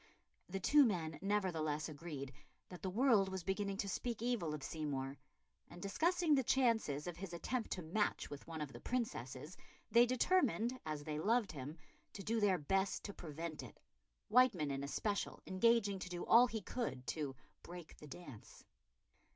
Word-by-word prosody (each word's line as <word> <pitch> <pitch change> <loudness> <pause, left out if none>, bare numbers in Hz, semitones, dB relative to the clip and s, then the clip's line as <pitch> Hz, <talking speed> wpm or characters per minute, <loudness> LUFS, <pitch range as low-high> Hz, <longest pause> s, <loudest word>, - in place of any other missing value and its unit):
The 195 +2 -2
two 290 +9 +6
men 165 - 0
nevertheless 165 -7 0
agreed 145 -3 -6 0.4
that 180 - -9
the 190 - -2
world 215 -2 +4
was 190 -2 -4
beginning 195 +1 -1
to 200 - -1
speak 235 +4 -2
evil 235 -10 0
of 150 -2 -5
Seymour, 140 -3 -3 0.5
and, 175 - -11
discussing 325 - +2
the 275 - +5
chances 225 - +2
of 175 -2 -5
his 185 -1 -6
attempt 230 +7 -2
to 180 - -5
match 195 +7 0
with 145 -1 -9
one 160 -2 -5
of 145 -3 -4
the 120 - -8
Princesses, 150 - -3 0.4
they 240 +1 +7
determined, 255 -3 +2
as 150 -1 -3
they 150 0 -3
loved 220 +5 +2
him, 145 +2 -6 0.4
to 195 - -7
do 225 +2 0
their 200 -3 +4
best 190 +6 0
to 205 - -5
prevent 160 -1 -6
it, - - -11 0.5
Wightman 210 - +4
in 135 0 -2
especial 200 +8 -2
engaging 200 0 +3
to 185 - -6
do 175 -1 -4
all 240 +2 +7
he 225 -2 -4
could 135 - -3
to 135 +2 -3 0.3
"break 175 -2 -10
the 150 - -11
dance." 140 -6 -11
185 Hz, 170 wpm, -38 LUFS, 150-225 Hz, 0.5 s, they